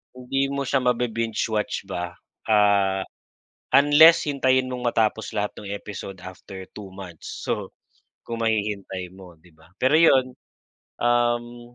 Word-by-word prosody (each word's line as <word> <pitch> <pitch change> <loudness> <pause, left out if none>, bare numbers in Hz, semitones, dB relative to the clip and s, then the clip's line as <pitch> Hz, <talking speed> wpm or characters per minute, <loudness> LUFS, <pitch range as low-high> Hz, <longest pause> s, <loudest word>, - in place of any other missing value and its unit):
hindi 135 +2 -1
mo 140 0 -2
siya 135 0 +1
mabi-binge 115 -2 -1 0.2
watch 105 -2 -2
ba, 90 -1 -5 0.3
ah, 100 -2 +3 0.7
unless 150 +4 +7
hintayin 130 -2 +2
mong 125 -1 -5
matapos 110 -1 0
lahat 105 0 -1
ng 100 - -9
episode 100 -1 -7
after 95 +1 -10
2 100 -2 -9
months. 90 -4 -9
So, - - -2 0.6
kung 115 0 -4
mahihintay 100 -4 -2
mo, 95 -2 -13
'di 85 +2 -22
ba? 80 - -21 0.2
Pero 135 +4 +4
yun, 130 -6 +4 0.7
um, 120 0 0
115 Hz, 135 wpm, -24 LUFS, 100-130 Hz, 0.7 s, unless